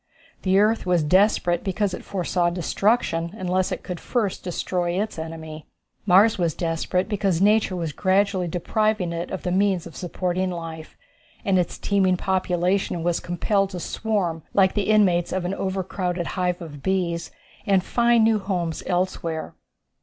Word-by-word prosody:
The 190 0 +2
earth 210 0 +2
was 175 -3 +3
desperate 180 0 +3
because 195 0 -1
it - - -6
foresaw 180 -2 0
destruction 175 0 0
unless 185 -1 0
it - - -4
could 180 -2 -5
first 220 -6 -2
destroy 175 0 -2
its 210 -5 -3
enemy. 160 -1 -7 0.4
Mars 200 +4 +5
was 170 -4 0
desperate 170 +2 -1
because 195 -5 0
nature 210 -1 +3
was 165 -3 -3
gradually 190 0 +1
depriving 185 +1 0
it 170 +1 -4
of 190 - -5
the 180 - -1
means 190 -2 +1
of 170 - -11
supporting 185 +1 -2
life, 165 -2 -7 0.5
and 190 -2 +3
its 175 - -2
teeming 190 -2 +2
population 180 -1 0
was 175 0 +1
compelled 195 +3 0
to 185 -2 -6
swarm 180 -5 -2
like 190 -2 +4
the 205 -1 -1
inmates 185 -5 +3
of 185 -1 -2
an 180 - -1
overcrowded 185 -2 -2
hive 180 -1 -1
of 145 -4 -9
bees, 175 -2 -1 0.4
and 195 -2 +3
find 235 +1 +3
new 220 -1 +3
homes 180 -5 -2
elsewhere. 175 -3 -2
185 Hz, 155 wpm, -24 LUFS, 175-195 Hz, 0.5 s, Mars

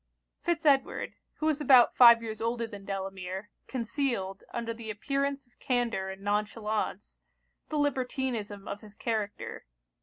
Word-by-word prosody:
Fitz 335 -2 -1
Edward, 275 -2 +2 0.2
who 310 - -4
was 310 -1 +2
about 255 -5 +7
five 235 -2 +8
years 220 -1 -5
older 230 +1 0
than 205 -3 -9
Delamere, 195 0 -5 0.2
concealed, 235 -6 -2
under 230 -1 -3
the 225 -1 -8
appearance 275 +5 -1
of 245 - -34
candour 235 -6 0
and 190 +1 -8
non 205 +1 +1
chalance, 215 -2 -3 0.5
the 310 - -1
libertinism 250 -7 -1
of 200 - -5
his 210 -1 -13
character. 215 - -3
230 Hz, 145 wpm, -30 LUFS, 205-265 Hz, 0.5 s, five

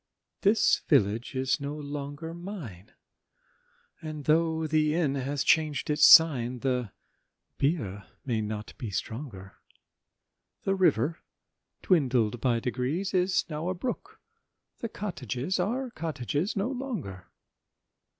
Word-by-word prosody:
This 210 +3 +4
village 115 -2 +2
is 130 +1 +1
no 140 +1 -4
longer 145 +2 -6
mine; 170 - -8 1.1
And 155 -3 -6
though 160 0 +2
the 155 0 +2
inn 160 -5 +1
has 140 +1 -2
chang'd 155 -2 +2
its 150 0 +2
sign, 130 -7 +6
The 125 -5 -1 0.7
beer 105 - -1 0.2
may 115 -4 0
not 105 0 -5
be 115 - -4
stronger: 100 -1 -6 1.1
The 195 - +1
river, 165 - +2 0.6
dwindled 125 - +2
by 120 -3 +2
degrees, 130 - -2
Is 185 0 +2
now 160 +2 -3
a 185 - -1
brook,—the 255 - -8
cottages 160 - -3
Are 245 +7 -1
cottages 155 - -2
no 200 +4 0
longer. 220 - -5
150 Hz, 110 wpm, -28 LUFS, 125-175 Hz, 1.1 s, sign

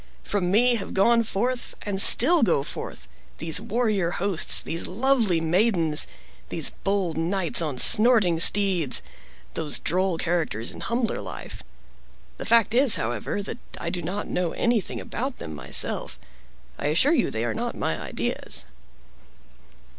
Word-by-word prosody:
From 190 -3 -2
me 240 +5 +4
have 200 - -7
gone 230 +4 +4
forth, 240 +3 -3
and 200 -2 -1
still 325 +11 +6
go 170 -10 +2
forth, - - -8 0.3
these 165 +4 -1
warrior 215 -6 0
hosts, 175 0 -1
these 165 - -4
lovely 225 -4 +1
maidens, 165 -2 +2 0.4
these - - -1
bold 195 -5 -1
knights 175 +1 0
on 150 -5 -3
snorting 215 - +4
steeds, 180 -7 +4 0.5
those 150 - +1
droll 185 +1 -1
characters 160 -11 -2
in - - -11
humbler 235 0 -2
life. - - -9 0.8
The - - -7
fact 230 -1 +3
is, 255 -2 +5
however, 120 - -3
that 225 - -7 0.2
I 170 - -3
do 175 - -4
not 190 +5 -4
know 180 -2 -2
anything 235 -4 -1
about 260 +2 -5
them 80 - -8
myself. 75 - 0 0.6
I 145 - -2
assure 180 - +3
you - - +1
they 110 +1 -3
are 115 - -2
not - - -4
my - - -2
ideas." - - -4
195 Hz, 145 wpm, -24 LUFS, 165-230 Hz, 0.8 s, still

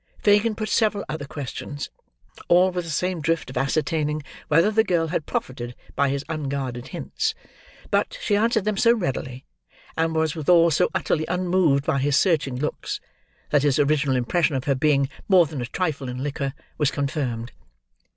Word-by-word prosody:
Fagin 210 +2 +3
put 215 0 -3
several 210 -1 +1
other 150 -2 -4
questions: 145 0 -6 0.6
all 180 +2 +5
with 180 -1 -3
the - - -7
same 180 +2 -1
drift 160 -3 -1
of 130 - -6
ascertaining 150 +2 0 0.2
whether 165 +8 +4
the 220 +1 +4
girl 170 -6 +1
had 160 -2 -2
profited 120 -1 -4 0.2
by 140 0 +2
his 140 0 -2
unguarded 135 -5 -3
hints; 440 0 -3 0.6
but, - - +1
she 210 - +1
answered 220 0 +2
them 210 -1 0
so 235 +2 +5
readily, 130 - -3 0.5
and 160 0 0
was 160 -1 +1
withal 170 +2 +4
so 155 - +3
utterly 155 -1 0
unmoved 180 -6 +2
by 140 - +1
his 140 +1 +2
searching 155 -8 +2
looks, 150 +4 -3 0.5
that 145 - +4
his 145 -2 +2
original 145 -2 +2
impression 145 +5 +1
of 130 - -1
her 140 - +2
being 140 0 +2 0.2
more 185 -3 +7
than 150 -4 -5
a 120 - -3
trifle 145 -4 -2
in 125 +1 -4
liquor, 140 -1 -3 0.2
was 150 -3 +3
confirmed. 135 -5 -2
155 Hz, 170 wpm, -24 LUFS, 140-180 Hz, 0.6 s, more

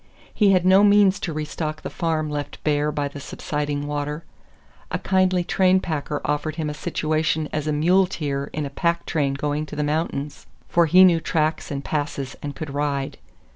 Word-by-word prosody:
He 210 -2 +4
had 185 -2 +3
no 190 +2 +6
means 205 -1 +5
to 170 - -3
restock 155 0 -4
the - - -4
farm 160 -2 -1
left 145 -1 -4
bare 150 0 +1
by 145 -1 -1
the 140 0 -8
subsiding 145 +1 -3
water. 150 +2 -3 0.7
A - - -1
kindly 185 -1 +2
train 185 +1 +3
packer 150 -4 -3
offered 150 +1 -1
him 155 -2 -2
a - - -5
situation 155 +1 -1
as 155 0 -2
muleteer 155 -3 +1
in 150 -1 -3
a 140 - -6
pack 170 +3 0
train 140 -4 0
going 150 +2 -2
to - - -8
the 150 - -1
mountains 150 -1 -3 0.2
for 170 -1 +3
he 185 +4 +7
knew 175 -3 +6
tracks 155 0 -1
and 140 -1 -4
passes 145 -3 -3
and 145 -1 -5
could 150 -2 -6
ride. 140 -1 -2
155 Hz, 180 wpm, -23 LUFS, 145-170 Hz, 0.7 s, he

